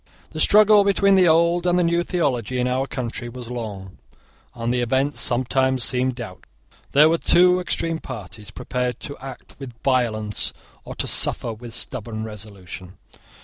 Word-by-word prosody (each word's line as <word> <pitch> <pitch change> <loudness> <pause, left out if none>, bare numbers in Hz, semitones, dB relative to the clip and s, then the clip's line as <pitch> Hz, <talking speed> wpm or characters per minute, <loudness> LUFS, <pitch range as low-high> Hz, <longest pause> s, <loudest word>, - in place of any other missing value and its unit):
The 155 - -7
struggle 210 +3 +6
between 200 0 +3
the 185 -2 +5
old 170 +2 +3
and 175 0 +3
the 180 - +3
new 170 0 +2
theology 135 -9 -1
in 125 0 0
our 130 +2 -1
country 120 -2 -5
was 125 0 -9
long, 100 -6 -7 0.6
and 120 0 -2
the 125 - 0
event 130 +4 0
sometimes 130 +1 0
seemed 130 +1 0
doubtful. 110 -7 -9 0.5
There 150 +2 +7
were 165 +1 +1
two 180 +1 +5
extreme 165 -2 -2
parties, 105 - -9
prepared 125 +1 -3
to 140 - -6
act 135 -1 -10
with 130 -4 -9
violence 110 -6 0 0.3
or - - -8
to - - -1
suffer 115 - 0
with 115 +1 -9
stubborn 115 -3 -3
resolution. 100 -4 -9
125 Hz, 160 wpm, -22 LUFS, 115-165 Hz, 0.6 s, There